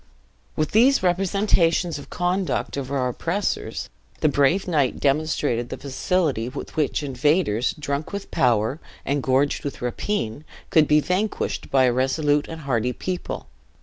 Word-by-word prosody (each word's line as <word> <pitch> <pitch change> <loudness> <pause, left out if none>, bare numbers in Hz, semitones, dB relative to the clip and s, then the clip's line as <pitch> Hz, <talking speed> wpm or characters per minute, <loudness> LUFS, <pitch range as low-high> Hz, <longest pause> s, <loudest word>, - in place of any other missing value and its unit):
"With 155 -1 -1
these 255 +4 +5
representations 180 -3 +2
of - - -12
the - - -10
conduct 180 +1 -1
of 135 -2 -4
our 130 -2 0
oppressors, 170 +10 -2 0.3
the 155 - +4
brave 145 +8 +2
knight 145 -7 +1
demonstrated 140 -4 0
the - - -5
facility 140 -3 -1
with - - -8
which 150 -1 0
invaders, 135 - +1
drunk 145 0 -3
with 200 -1 -6
power, 120 +3 +2 0.3
and 140 +1 0
gorged 135 +2 +1
with 140 - -5
rapine, 125 - -2 0.3
could 160 -5 +5
be 150 0 +5
vanquished 195 +6 -2
by 135 -1 +4
a 125 -1 +3
resolute 145 +3 +1
and 160 0 -7
hardy 125 -3 0
people. 180 +5 -4
145 Hz, 150 wpm, -23 LUFS, 130-175 Hz, 0.3 s, these